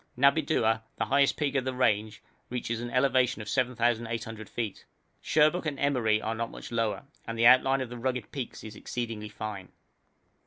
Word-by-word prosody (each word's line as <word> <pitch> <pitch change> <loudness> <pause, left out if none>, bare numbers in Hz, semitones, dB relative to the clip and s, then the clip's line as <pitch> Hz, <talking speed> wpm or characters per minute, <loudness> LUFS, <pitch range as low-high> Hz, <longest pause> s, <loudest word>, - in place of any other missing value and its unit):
Nabidua, 140 -5 +3 0.2
the 110 - 0
highest 140 +4 +3
peak 145 -2 0
of 135 -2 +1
the 130 0 -3
range, 110 -4 +1 0.3
reaches 120 -2 -3
an 120 - -4
elevation 125 -1 +2
of 105 - -7
7,800 115 -3 -1
feet; 115 -4 -4 0.4
Sherbuk 155 +3 +3
and 145 -2 -2
Emeri 125 -7 +2
are 110 +1 -2
not 115 +1 -3
much - - -10
lower, 115 -4 -1 0.2
and 115 0 -4
the 115 - +3
outline 130 +2 +6
of 130 - -4
the 120 0 -7
rugged 125 -2 -2
peaks 135 -4 -6
is 110 -1 -8
exceedingly 115 -3 -5
fine. 105 -3 -6
120 Hz, 170 wpm, -29 LUFS, 110-130 Hz, 0.4 s, outline